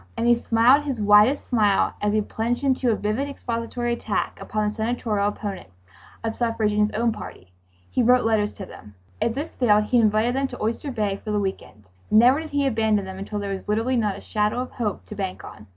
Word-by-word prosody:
And 230 Hz, -, -1 dB
he 240 Hz, -, +6 dB
smiled 240 Hz, +5 st, +4 dB
his 270 Hz, -5 st, -3 dB
widest 210 Hz, +6 st, +5 dB
smile 210 Hz, -5 st, +2 dB
as 210 Hz, -, +1 dB
he 215 Hz, +1 st, +2 dB
plunged 230 Hz, +5 st, -2 dB
into 260 Hz, -2 st, +1 dB
a 225 Hz, -, +3 dB
vivid 215 Hz, +8 st, -2 dB
expository 240 Hz, -2 st, -3 dB
attack 220 Hz, -3 st, -2 dB
upon 215 Hz, 0 st, -2 dB
the 210 Hz, -, -2 dB
Senatorial 220 Hz, -2 st, -1 dB
opponents 200 Hz, -, -6 dB, 0.5 s
of 225 Hz, 0 st, -2 dB
suffrage 230 Hz, -3 st, 0 dB
in 210 Hz, -, 0 dB
his 215 Hz, -, -9 dB
own 230 Hz, +1 st, +1 dB
party. 90 Hz, -, -10 dB, 0.4 s
He 255 Hz, -, +1 dB
wrote 250 Hz, +1 st, +4 dB
letters 215 Hz, -2 st, +1 dB
to 195 Hz, -, -7 dB
them. 105 Hz, -, -14 dB, 0.3 s
If 230 Hz, -, 0 dB
this 295 Hz, +4 st, -4 dB
failed, 210 Hz, -4 st, +4 dB
he 240 Hz, +3 st, +2 dB
invited 220 Hz, +2 st, +2 dB
them 270 Hz, 0 st, 0 dB
to -, -, -9 dB
Oyster 230 Hz, +6 st, -2 dB
Bay 210 Hz, -5 st, -1 dB
for -, -, -6 dB
the 210 Hz, -1 st, +1 dB
week 195 Hz, -1 st, -2 dB
end. 105 Hz, -, -17 dB, 0.3 s
Never 245 Hz, +6 st, +5 dB
did 320 Hz, 0 st, -7 dB
he 285 Hz, -1 st, 0 dB
abandon 220 Hz, -5 st, +1 dB
them 190 Hz, 0 st, -8 dB
until 205 Hz, +2 st, -5 dB
there 200 Hz, -1 st, -3 dB
was 190 Hz, -, -7 dB
literally 225 Hz, +5 st, +1 dB
not 210 Hz, -5 st, 0 dB
a -, -, -10 dB
shadow 210 Hz, +2 st, -1 dB
of 255 Hz, -, -6 dB
hope 215 Hz, -5 st, -3 dB
to -, -, -9 dB
bank 195 Hz, -3 st, -5 dB
on. 105 Hz, -, -12 dB
220 Hz, 225 wpm, -23 LUFS, 210-245 Hz, 0.5 s, he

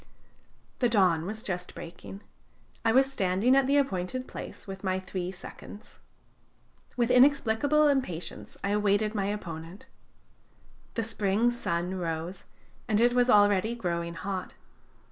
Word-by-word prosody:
"The 245 Hz, -, +3 dB
dawn 180 Hz, -7 st, +3 dB
was 220 Hz, +2 st, -5 dB
just 180 Hz, -2 st, -4 dB
breaking. 175 Hz, +3 st, -9 dB, 0.6 s
I 225 Hz, -, +3 dB
was 270 Hz, +3 st, +3 dB
standing 195 Hz, +4 st, +2 dB
at 270 Hz, -1 st, +4 dB
the 280 Hz, +1 st, +3 dB
appointed 255 Hz, -1 st, -1 dB
place -, -, -8 dB
with 195 Hz, 0 st, -8 dB
my 185 Hz, -1 st, 0 dB
three 185 Hz, -1 st, -4 dB
seconds. 200 Hz, +3 st, -12 dB, 1.0 s
With 240 Hz, 0 st, +2 dB
inexplicable 280 Hz, +2 st, +4 dB
impatience 255 Hz, -, -2 dB
I 195 Hz, -, 0 dB
awaited 210 Hz, +1 st, +2 dB
my 200 Hz, -3 st, -1 dB
opponent. 175 Hz, -3 st, -6 dB, 1.1 s
The 230 Hz, -, 0 dB
spring 220 Hz, +1 st, +1 dB
sun 180 Hz, -6 st, -2 dB
rose, 170 Hz, +2 st, -4 dB, 0.4 s
and 215 Hz, -2 st, +2 dB
it 240 Hz, +1 st, +4 dB
was 245 Hz, 0 st, +3 dB
already 205 Hz, 0 st, +4 dB
growing 170 Hz, -5 st, -3 dB
hot. 185 Hz, +1 st, -5 dB
205 Hz, 130 wpm, -28 LUFS, 180-240 Hz, 1.1 s, at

